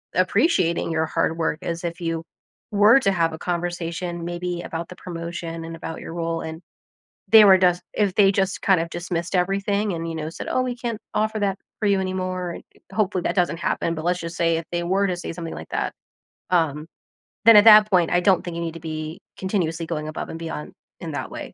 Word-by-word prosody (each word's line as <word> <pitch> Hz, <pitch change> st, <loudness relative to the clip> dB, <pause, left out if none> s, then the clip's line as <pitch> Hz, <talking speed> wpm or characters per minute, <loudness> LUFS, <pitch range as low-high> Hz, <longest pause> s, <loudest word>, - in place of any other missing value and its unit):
appreciating 170 Hz, -, +2 dB
your 160 Hz, 0 st, +1 dB
hard 160 Hz, +1 st, 0 dB
work 160 Hz, -1 st, -1 dB
as 170 Hz, -1 st, -4 dB
if 170 Hz, +1 st, -4 dB
you 165 Hz, -1 st, -2 dB, 0.5 s
were 210 Hz, +6 st, +6 dB
to 195 Hz, -6 st, +2 dB
have 165 Hz, -3 st, +1 dB
a -, -, -5 dB
conversation 175 Hz, 0 st, -3 dB
maybe 175 Hz, 0 st, -3 dB
about 165 Hz, 0 st, -5 dB
the 180 Hz, -, -9 dB
promotion 170 Hz, -1 st, -6 dB
and 165 Hz, 0 st, -7 dB
about 165 Hz, 0 st, -6 dB
your -, -, -7 dB
role 165 Hz, -1 st, -2 dB
and 160 Hz, +1 st, -7 dB, 0.7 s
they 220 Hz, -1 st, +9 dB
were 190 Hz, -2 st, +8 dB
dust 180 Hz, -1 st, +3 dB
if 205 Hz, -3 st, +1 dB
they 195 Hz, -2 st, +6 dB
just 190 Hz, 0 st, -1 dB
kind 190 Hz, -4 st, +4 dB
of 165 Hz, 0 st, -3 dB
dismissed 175 Hz, +1 st, -4 dB
everything 200 Hz, +3 st, 0 dB
and, 165 Hz, 0 st, -4 dB
you 165 Hz, -, -4 dB
know, 155 Hz, 0 st, -4 dB
said, -, -, -7 dB
"Oh, 255 Hz, -, +1 dB
we 250 Hz, -1 st, -3 dB
can't 235 Hz, -3 st, -4 dB
offer 215 Hz, 0 st, 0 dB
that 195 Hz, -1 st, 0 dB, 0.2 s
for 215 Hz, -, +1 dB
you 200 Hz, -1 st, +3 dB
anymore. 185 Hz, -2 st, -3 dB, 0.3 s
Hopefully, 195 Hz, -3 st, 0 dB
that -, -, -1 dB
doesn't 175 Hz, -2 st, +1 dB
happen. 170 Hz, -1 st, -1 dB
But 155 Hz, -, -5 dB
let's 180 Hz, +1 st, +1 dB
just 170 Hz, 0 st, -6 dB
say 165 Hz, -1 st, +2 dB
if 165 Hz, -, -5 dB
they 175 Hz, 0 st, -1 dB
were 195 Hz, +3 st, +2 dB
to 180 Hz, -, -1 dB
say 175 Hz, -, -5 dB
something 165 Hz, -1 st, -6 dB
like -, -, -9 dB
that, -, -, -1 dB, 0.6 s
um, 160 Hz, -3 st, +1 dB, 0.6 s
then 230 Hz, -, +10 dB
at 205 Hz, -, +8 dB
that 215 Hz, -1 st, +9 dB
point, 175 Hz, -4 st, +3 dB
I 175 Hz, -, +3 dB
don't 190 Hz, -1 st, +3 dB
think 175 Hz, -, -5 dB
you 170 Hz, -, -3 dB
need 165 Hz, -1 st, -4 dB
to 165 Hz, -, -9 dB
be 155 Hz, 0 st, -5 dB, 0.2 s
continuously 170 Hz, -4 st, -1 dB
going 155 Hz, -2 st, -3 dB
above 155 Hz, -, -5 dB
and 165 Hz, -, -6 dB
beyond 160 Hz, -2 st, -6 dB, 0.3 s
in -, -, -5 dB
that -, -, -4 dB
way. -, -, -8 dB
175 Hz, 220 wpm, -23 LUFS, 165-190 Hz, 0.7 s, then